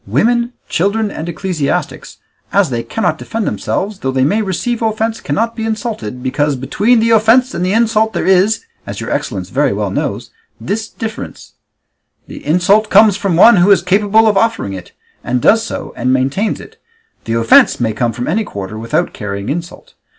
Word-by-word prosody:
Women, 235 - +1
children, 205 +4 0
and 165 -1 -6
ecclesiastics, 170 -5 -3 0.3
as 195 -8 +2
they 120 -1 -1
cannot 175 - -2
defend 225 -2 -4
themselves, 200 0 -3
though 130 - -2
they 130 0 +1
may 205 +11 +1
receive 220 +5 -2
offence 225 0 -1
cannot 230 +2 -1
be 225 - -4
insulted, 215 - -4
because 145 +2 0
between 205 - +1
the 230 +1 +2
offence 225 +4 +4
and 175 - -2
the 185 +2 0
insult 220 -1 +2
there - - -2
is, 190 +3 +3 0.3
as - - -6
your - - -5
excellence - - -3
very - - +1
well - - -2
knows, - - -3 0.3
this 220 +2 -3
difference: 225 -1 -7 0.7
the - - -11
insult 185 +7 +2
comes 215 -3 +6
from 195 -3 -1
one 225 +6 +7
who 180 +3 +4
is 195 -4 +5
capable 205 +4 +3
of 210 -2 +2
offering 225 - 0
it, 90 -2 -9 0.3
and 125 - -1
does 225 - +4
so, - - -6
and 125 +1 -1
maintains 135 +12 0
it; - - -14 0.4
the 115 - -2
offence 115 0 +4
may 115 -3 0
come 120 +2 -1
from 120 +2 -5
any 215 +8 0
quarter 100 - -7
without 115 +1 -1
carrying 100 -1 -5
insult. 170 +4 -6
195 Hz, 180 wpm, -15 LUFS, 135-220 Hz, 0.7 s, one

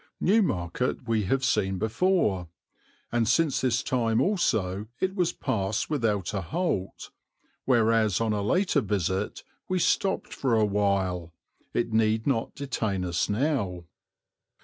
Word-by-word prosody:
Newmarket 125 - 0
we 110 -3 +1
have 135 +6 +1
seen 105 -5 +1
before, 110 - +1 0.6
and 120 -2 +1
since 150 +4 +2
this 125 0 +1
time 115 -4 +1
also 105 - 0
it 190 0 0
was 180 -4 +1
passed 100 +5 -2
without 110 - 0
a 100 - -1
halt, 100 - -3 0.5
whereas 115 -5 +3
on 115 -1 +1
a 105 - -1
later 170 - +2
visit 95 -2 -2 0.3
we 185 - +1
stopped 190 +2 0
for 130 -4 0
a 110 -1 +4
while, 95 -4 0 0.4
it 115 -1 0
need 110 0 +2
not 125 -5 -1
detain 110 -9 -2
us 85 -1 -1
now. 105 - -1
110 Hz, 130 wpm, -27 LUFS, 100-135 Hz, 0.6 s, a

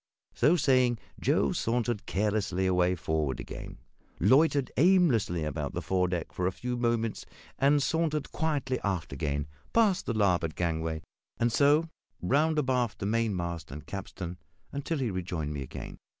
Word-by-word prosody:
So 150 +8 +4
saying, 130 -6 +3 0.2
Joe - - +2
sauntered 120 -2 -1
carelessly 100 -2 0
away 90 0 +3
forward 80 -5 -1
again; - - -8 0.4
loitered 140 - +4
aimlessly 135 - +3
about 75 -3 -3
the - - -2
foredeck 90 -3 -1
for 90 - 0
a - - +1
few 125 +6 -4
minutes; 115 -2 0 0.5
sauntered 155 +1 0
quietly 140 -5 -1
aft 95 -8 -2
again 70 0 -2 0.3
past 215 -5 +3
the 115 - 0
larboard 90 -7 +1
gangway, 80 -2 -2 0.3
and 120 0 +1
so 145 +6 +4 0.3
round 150 - +2
abaft 125 -5 +1
the - - -4
mainmast 95 -7 -1
and 75 +2 -8
capstan 90 -3 -6 0.3
until 145 +3 -2
he 125 -6 -1
rejoined 85 -5 -3
me 70 - -4
again. 65 - -7
105 Hz, 140 wpm, -29 LUFS, 85-135 Hz, 0.5 s, So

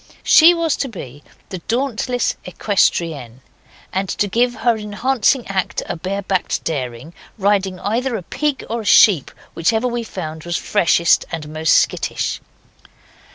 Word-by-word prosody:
She 335 +2 +7
was 330 -2 0
to 275 - -2
be 145 - -10 0.3
the 185 - -6
Dauntless 245 0 -1
Equestrienne, 165 - -1 0.5
and 190 0 -2
to 205 - 0
give 240 +4 +1
her 230 +1 +1
enhancing 235 +4 0
act 195 -2 -2
a - - -4
barebacked 190 +2 -2
daring, 130 0 -4 0.2
riding 195 -2 0
either 240 +4 -1
a 190 - -8
pig 295 - -2
or 230 +1 -3
a - - -10
sheep, 195 - +5 0.2
whichever 220 +8 +1
we 240 -1 -2
found 160 -7 -7
was 175 0 -2
freshest 170 -4 +2
and 155 -2 -6
most 155 0 +2
skittish. - - 0
200 Hz, 140 wpm, -19 LUFS, 165-235 Hz, 0.5 s, She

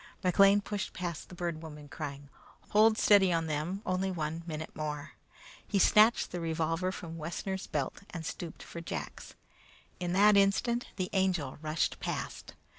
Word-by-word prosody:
McLean 195 +3 +5
pushed 205 -1 -4
past 175 -3 -5
the 180 - -10
Bird 170 -2 -3
Woman 150 -2 -9
crying. 145 -1 -7 0.4
"Hold 215 +1 +5
steady 200 -4 +5
on 165 -1 +1
them 160 +6 -2
only 185 +1 0
one 160 -2 -3
minute 155 -1 -5
more!" 150 -1 -4 0.6
He 205 - 0
snatched 215 +4 +5
the 180 - -3
revolver 165 +2 -1
from 165 -3 -7
Wessner's 185 +4 -4
belt, 140 -3 -3
and 165 -3 -6
stooped 165 0 -6
for 170 - -8
Jack's. 165 - -6 0.7
At 175 -1 -1
that 205 +2 +6
instant 215 +5 +2
the 185 -2 -3
Angel 185 -9 0
rushed 155 0 -1
past. - - -5
175 Hz, 155 wpm, -31 LUFS, 155-195 Hz, 0.7 s, that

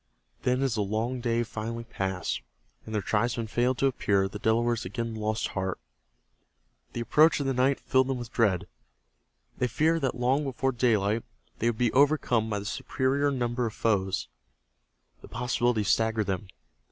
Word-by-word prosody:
Then 125 +1 +1
as 135 -4 +1
the 110 - 0
long 110 +5 -1
day 120 -1 +1
finally 115 +1 -5
passed 95 -6 -3 0.5
and 110 - -4
their 105 - 0
tribesmen 115 +2 0
failed 120 +3 +1
to 135 - +1
appear 100 -7 +2
the 105 +2 -8
Delawares 115 +1 +1
again 115 +4 -4
lost 110 0 -1
heart. 95 -1 -2 1.2
The 120 - -3
approach 150 +6 +4
of 140 - -2
night 135 +1 +2
filled 130 0 +2
them 135 -1 -1
with 120 -2 -7
dread. 100 -7 +1 0.9
They 125 - +2
feared 160 +7 +1
that 135 - 0
long 125 +4 +1
before 135 -1 -1
daylight 115 -3 +2 0.4
they 115 - +2
would 115 - -3
be 120 -1 +1
overcome 130 -5 +3
by 105 - -1
the 100 - -5
superior 135 +5 0
numbers 120 -3 -1
of - - -16
their - - -19
foes. 95 -3 -1 0.9
The - - -12
possibility 120 -2 0
staggered 110 +1 +2
them. 95 +1 -3
115 Hz, 165 wpm, -28 LUFS, 110-130 Hz, 1.2 s, approach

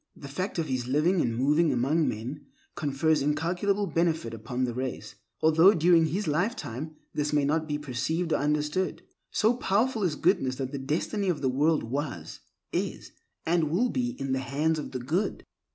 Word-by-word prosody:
The 140 - -10
fact 185 +9 -3
of 165 - 0
his 130 -4 -2
living 160 +7 +2
and 115 -5 0
moving 150 +5 +3
among 140 +6 +2
men 125 +7 -5 0.3
confers 150 +2 +1
incalculable 175 +8 0
benefit 165 -10 0
upon 115 +3 -3
the 120 -1 -1
race, 130 +1 -4 0.3
although 160 +6 +6
during 165 0 +5
his 190 +7 -2
lifetime 155 - -2 0.2
this 150 0 -1
may 145 -1 +2
not 155 +2 0
be 150 -1 -1
perceived 155 +5 -2
or - - +3
understood. 150 +5 -1 0.3
So 220 +3 +3
powerful 225 +2 +1
is 175 -6 +1
goodness 170 -7 +2
that 130 0 -4
the 140 - -4
destiny 170 +8 -1
of 160 -5 -1
the 130 - +3
world 150 +5 +2
was, 120 - -4 0.3
is, - - -3 0.3
and 165 -2 +2
will 215 +11 +2
be 250 0 -2
in 135 -1 -2
the 130 - +1
hands 150 +4 0
of - - -5
the 130 - -4
good. 155 - -2
150 Hz, 180 wpm, -28 LUFS, 135-175 Hz, 0.3 s, although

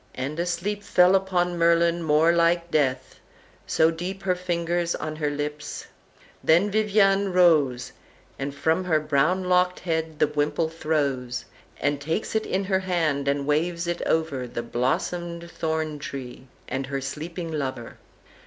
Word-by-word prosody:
"And 140 +5 -4
a 175 - 0
sleep 195 +4 -2
Fell 180 -2 +4
upon 180 -2 +1
Merlin 170 0 +3
more 160 +1 +4
like 170 0 +2
death, 130 -3 0 0.5
so 160 +1 +3
deep 180 +4 -5
Her 185 -1 +2
finger 175 -1 -1 0.2
on 155 0 -4
her 150 -2 0
lips; 150 +1 -5 0.6
then 175 +6 +4
Vivian 200 -2 +3
rose, 155 -9 +3 0.5
And 140 +1 -4
from 160 +5 +1
her 160 -4 +3
brown 155 +5 +1
locked 180 0 +2
head 160 -2 -2
the - - +4
wimple 150 +2 0
throws, 140 -6 -2 0.3
And 140 0 0
takes 160 +8 -2
it 220 0 0
in 190 +1 0
her 190 -1 +1
hand 165 -7 0
and 140 0 0
waves 170 +4 0
it 175 0 -2
over 150 -6 0
The 120 0 -5
blossomed 170 +8 -2
thorn 160 -2 -2
tree 130 -2 -7 0.2
and 135 0 -3
her 140 0 -2
sleeping 165 +5 -5
lover. 130 -6 -4
160 Hz, 150 wpm, -25 LUFS, 145-180 Hz, 0.6 s, Fell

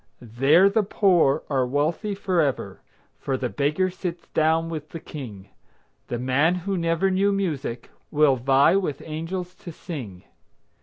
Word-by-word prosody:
There 135 - +4
the 205 +2 +2
poor 180 -8 +2
are 135 -3 +1
wealthy 155 - -1
forever, 170 -8 -1 0.4
For 135 -1 -2
the 125 -1 -2
beggar 150 +8 0
sits 180 -2 -6
down 160 +1 +2
with 155 -2 -6
the 165 - -7
King. 110 -12 -9 0.6
The 120 - -3
man 135 +8 +2
who 190 +2 -3
never 170 +2 +1
knew 195 +2 +2
music 150 -11 -3 0.2
Will 150 -3 +4
vie 135 +7 +4
with 180 -8 -3
angels 170 +3 -5
to 180 -1 -10
sing. 125 - -8
160 Hz, 145 wpm, -24 LUFS, 135-180 Hz, 0.6 s, There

